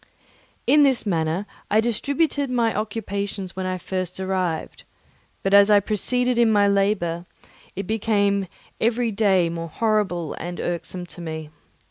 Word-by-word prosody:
In 295 +4 +5
this 270 -5 +3
manner 165 0 0 0.2
I 215 - +4
distributed 280 +5 0
my 235 -3 +1
occupations 200 -3 -4
when 190 0 -3
I 185 0 -2
first 185 0 -4
arrived, 185 -4 -2 0.6
but 195 - 0
as 200 +1 +7
I 205 -1 +7
proceeded 245 +4 0
in 230 -2 +5
my 205 -1 +4
labour, 195 -4 0 0.5
it 195 - -4
became 200 -2 +1 0.3
every 230 +1 +1
day 195 -4 +3
more 165 0 -4
horrible 200 -5 0
and 175 +1 -6
irksome 175 +1 -3
to 175 - -9
me. 160 -2 -6
200 Hz, 140 wpm, -23 LUFS, 180-220 Hz, 0.6 s, as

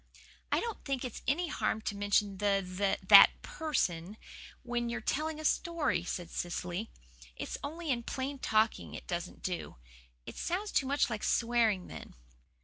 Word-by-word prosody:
"I - - +3
don't 465 -2 -5
think 270 -2 -2
it's 245 - -6
any 335 +4 +1
harm 255 - 0
to 205 - -3
mention 205 -1 +1
the 200 -2 +2
the 195 +2 0
that - - +9
person, 205 - -2 0.5
when 240 -1 -2
you're 235 +1 -2
telling 310 +7 -2
a 310 - -6
story," 335 - +1
said 175 -1 -5
Cecily. 180 +4 -3 0.5
"It's - - -5
only 315 +2 -3
in 240 -2 0
plain 265 +3 -4
talking 220 -2 +1
it - - -8
doesn't 175 -2 -5
do. 180 -2 -4 0.5
It - - -9
sounds 395 +4 -2
too 270 - +1
much 280 -2 +1
like 215 -2 -3
swearing 230 -5 +2
then." - - -10
235 Hz, 160 wpm, -32 LUFS, 200-290 Hz, 0.5 s, that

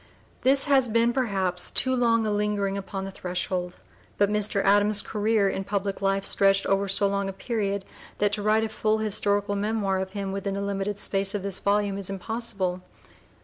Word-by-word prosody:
This 270 +1 +4
has 270 -3 +3
been, 230 +1 +2
perhaps, 195 -8 0
too 260 0 +2
long 230 -2 +2
a 215 - 0
lingering 205 -1 0
upon 195 0 -5
the 195 - -6
threshold. 180 -1 -3 0.4
But 205 0 +2
Mr. 210 -1 +1
Adams's 205 +1 +4
career 210 -1 +1
in 195 0 -2
public 200 0 -3
life 195 0 0
stretched 195 0 +3
over 195 0 +1
so 195 +1 +2
long 200 0 -1
a - - -3
period 200 -1 -3 0.3
that 205 0 +1
to 210 - -1
write 215 +1 +2
a 220 - -2
full 215 0 0
historical 205 -1 0
memoir 200 -2 0
of 190 0 -5
him 195 -1 -3
within 195 0 -3
the 200 - -3
limited 200 0 -2
space 195 0 -1
of 200 - -3
this 195 -1 -2
volume 200 -1 0
is 195 - -2
impossible. 195 -2 -2
200 Hz, 190 wpm, -26 LUFS, 195-215 Hz, 0.4 s, This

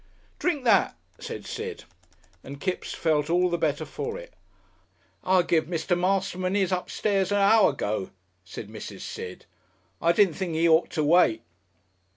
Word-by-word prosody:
"Drink 315 -7 0
that," 240 - +3 0.2
said - - -7
Sid, 445 -1 -6 0.6
and 140 +1 -9
Kipps 185 +3 -3
felt 155 -2 0
all 180 +1 +2
the 170 - +1
better - - 0
for 460 +1 -5
it. - - -11 0.9
"I 185 -1 +3
give 165 -2 +1
Mr. 170 +1 -1
Masterman 185 +1 0
'is 190 -2 +1
upstairs 195 +1 0
a - - +2
hour 205 +2 +5
ago," 105 -8 -3 0.3
said 95 +3 -8
Mrs. 105 -2 -9
Sid. 90 0 -7 0.6
"I 170 - +4
didn't 180 0 +4
think 175 -3 -3
'e 165 +1 +3
ought 160 +1 +4
to 155 - -1
wait." 150 -8 +4
180 Hz, 155 wpm, -26 LUFS, 155-195 Hz, 0.9 s, hour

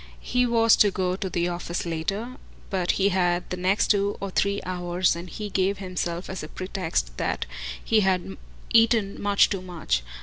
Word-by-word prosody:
He 250 0 +1
was 230 -1 +5
to 205 - +6
go 185 -2 -1
to 190 0 -4
the 175 -1 0
office 175 0 -3
later, 195 +9 -3 0.3
but 185 -2 +1
he 195 +1 +2
had 180 -2 +1
the - - 0
next 185 +3 +1
two 200 0 +1
or 200 0 -4
three 200 +2 +1
hours, 180 0 0
and 175 +1 -7
he 210 +3 -5
gave 195 +1 +1
himself 180 -2 -3
as 190 - -5
a 155 - -6
pretext 165 - -3
that - - -1 0.4
he 225 - +3
had 190 -1 0 0.4
eaten 225 -3 +4
much 205 0 +4
too 195 -2 -1
much. 165 - -2
190 Hz, 180 wpm, -25 LUFS, 175-200 Hz, 0.4 s, to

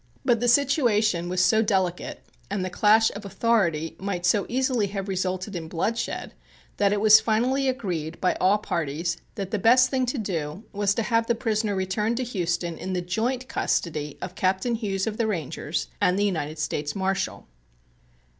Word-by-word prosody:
But 235 -2 +3
the 245 - 0
situation 230 - +3
was 185 0 +2
so 220 +2 +4
delicate 190 -5 -1 0.3
and 195 -2 -2
the 185 - -4
clash 220 +4 +4
of 205 - -8
authority 190 -7 0
might 185 -2 -3
so 195 +3 +2
easily 250 -4 +1
have 195 0 -5
resulted 185 +1 -2
in 165 -2 -5
bloodshed 210 +8 -2 0.4
that 200 -1 +3
it 205 - +1
was 215 +1 +8
finally 250 +5 +1
agreed 175 - -3
by 185 - +2
all 190 +3 +4
parties 170 -3 -2 0.2
that 195 -4 -5
the 215 - 0
best 250 +5 +5
thing 260 -2 +1
to 250 - -2
do 170 -4 -3
was 200 -1 +1
to 230 - 0
have 230 0 +1
the 235 - +2
prisoner 215 -3 -1
returned 200 +5 -1
to 255 - 0
Houston 175 -7 -2
in 190 - -4
the 180 - -1
joint 235 +8 -2
custody 150 - -2
of 180 - -5
Captain 190 +6 0
Hughes 200 -4 -1
of 220 -1 -3
the 230 - +1
Rangers 160 - -3
and 180 - +3
the 205 - +2
United 160 -5 -2
States 145 -1 -2
Marshal. 190 0 -2
200 Hz, 180 wpm, -25 LUFS, 180-225 Hz, 0.4 s, was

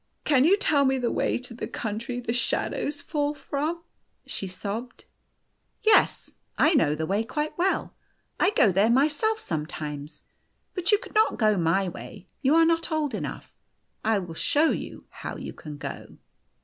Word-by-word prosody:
" - - -48
Can 270 -1 +6
you 385 +5 +5
tell 300 -9 +3
me 265 0 +3
the 245 -2 0
way - - +1
to 245 -1 -7
the 235 - -5
country 230 +3 -4
the 230 -1 -2
shad 245 -1 0
ows 290 0 -3
fall 295 -1 -1
from? 310 +4 -3 0.2
" - - -47
she 195 - -4
sobbed. 205 +6 -6 0.4
" - - -48 0.3
Yes. 435 -1 +4 0.3
I 310 - +5
know 155 - +3
the 160 +1 -2
way 200 +6 0
quite 300 +6 -3
well. 365 +3 0 0.5
I 370 - +4
go 320 - +4
there 195 +5 +3
myself 300 - +2
sometimes. 150 - -5 0.5
But 365 +1 0
you 415 - +6
could - - -12
not 435 +1 +3
go 215 -2 +3
my 185 +2 +2
way; 195 +3 -9
you 275 +4 +4
are 330 0 +6
not 330 0 +1
old 310 -3 0
enough. - - -6 0.5
I 220 0 +3
will 175 -4 -5
show 295 - +2
you - - -5
how - - -6
you - - -7
can 150 -2 -9
go." - - -7
250 Hz, 185 wpm, -26 LUFS, 195-310 Hz, 0.5 s, Can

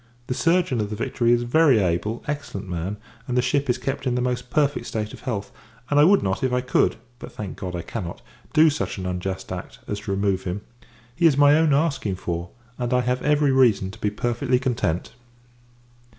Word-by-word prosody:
The 125 - -2
surgeon 165 -5 +2
of 105 - -2
the 105 - -4
Victory 120 +2 0
is 120 0 +3
a - - -4
very 140 0 +5
able, 100 +4 0
excellent 145 -9 -4
man, 90 +3 -3 0.3
and 125 -1 -1
the - - +5
ship 140 +2 0
is 125 - +2
kept 135 +2 -3
in 125 - +1
the - - +1
most 125 0 -2
perfect 145 +1 +1
state 110 -1 -3
of - - -10
health; 100 -6 -4 0.4
and, 145 - +4
I - - +8
would 200 +3 +5
not, 95 +7 -1
if 130 - +1
I 125 - +2
could 125 - +2 0.2
but, - - -9
thank 105 -3 -6
[God] 90 -1 -4
I 85 - -4
cannot 85 0 -5 0.3
do 155 0 +6
such 145 - -3
an 95 - -5
unjust 95 +1 -4
act, 90 -1 -6
as 105 - -3
to 105 -1 -5
remove 95 -1 0
him. 90 +2 -3 0.5
He 170 -1 +5
is 145 -4 +3
my 145 0 +6
own 160 -1 +3
asking 140 - +1
for! 85 -1 -4 0.3
and, 120 -1 -2
I 125 - +3
have 125 0 -1
every 150 -1 +3
reason 115 -8 +3
to 110 - -13
be 105 - +1
perfectly 120 +4 0
content. 115 - -1
120 Hz, 220 wpm, -24 LUFS, 100-140 Hz, 0.5 s, I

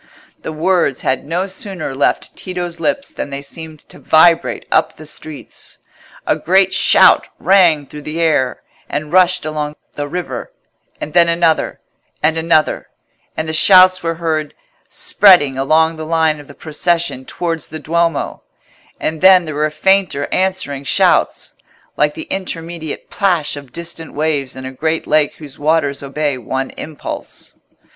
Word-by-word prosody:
The - - -5
words 165 -3 0
had 130 - -1
no 175 +5 -1
sooner 190 -6 -6
left 135 - 0
Tito's 175 -2 -5
lips 285 +2 -2
than 145 - -5
they 140 0 -6
seemed 155 +1 -10
to - - -15
vibrate 165 +1 +3
up 160 - +2
the 155 - -11
streets. 150 0 -9 0.5
A - - +2
great 190 +2 +2
shout - - +5
rang 175 -6 +4
through 150 +2 -10
the 155 +3 -5
air, 145 -6 +1 0.3
and 150 +2 -4
rushed 185 -2 +3
along 150 -1 -3 0.2
the 145 0 -4
river; 145 -7 -5 0.5
and 150 - -6
then 170 -1 +5
another, 165 -1 +1 0.4
and 155 +1 +3
another; 160 -1 +1 0.5
and 160 - -2
the 160 - -3
shouts 185 +2 +6
were 165 0 -2
heard 160 -3 -2 0.3
spreading 175 -9 +4
along 160 +4 +2
the 155 - -6
line 160 -2 +1
of 145 - -13
the 140 - -13
procession 165 -2 -1
towards 165 +3 -4
the 155 - -7
Duomo; 165 0 -1 0.6
and 160 0 -3
then 185 -2 +7
there 155 - -5
were 150 +1 0
fainter 180 -2 +1
answering 185 -7 -1
shouts, 135 - +1 0.4
like 150 0 +1
the - - -6
intermediate 165 -4 -5
plash 175 -8 0
of 140 -3 -10
distant 165 0 -7
waves 145 -3 -1
in 130 0 -8
a 130 - -5
great 160 +4 -2
lake 150 -1 +2
whose 145 -3 -10
waters 145 -2 +1
obey 140 -1 -2
one 130 +3 -3
impulse. 155 -1 -8
160 Hz, 150 wpm, -17 LUFS, 145-175 Hz, 0.6 s, then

